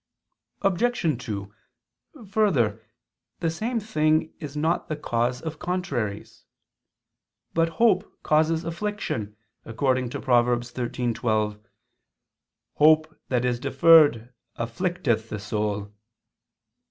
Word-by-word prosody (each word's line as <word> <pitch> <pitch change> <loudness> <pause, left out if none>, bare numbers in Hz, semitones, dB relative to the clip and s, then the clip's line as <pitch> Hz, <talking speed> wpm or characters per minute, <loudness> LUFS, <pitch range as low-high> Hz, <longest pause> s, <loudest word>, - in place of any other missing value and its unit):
Obj. 195 - +1
2: 100 -2 -5 0.8
Further, 140 - +2 0.6
the 165 -2 0
same 230 +8 -2
thing 155 -7 +1
is 150 -3 -7
not 160 +3 0
the 155 - -2
cause 125 -3 -1
of 160 -2 -5
contraries. 135 - -3 1.1
But 165 0 +2
hope 215 -5 +3
causes 160 +2 +2
affliction, 165 - -4 0.3
according 130 +2 0
to - - -5
Prov. 120 -2 +3
13:12: 120 -3 -2 1.2
"Hope 155 +1 +4
that 125 -1 +1
is 120 -1 0
deferred 135 -5 +5 0.2
afflicteth 115 -2 -1
the 105 - -4
soul." 105 0 -3
140 Hz, 95 wpm, -25 LUFS, 115-165 Hz, 1.2 s, deferred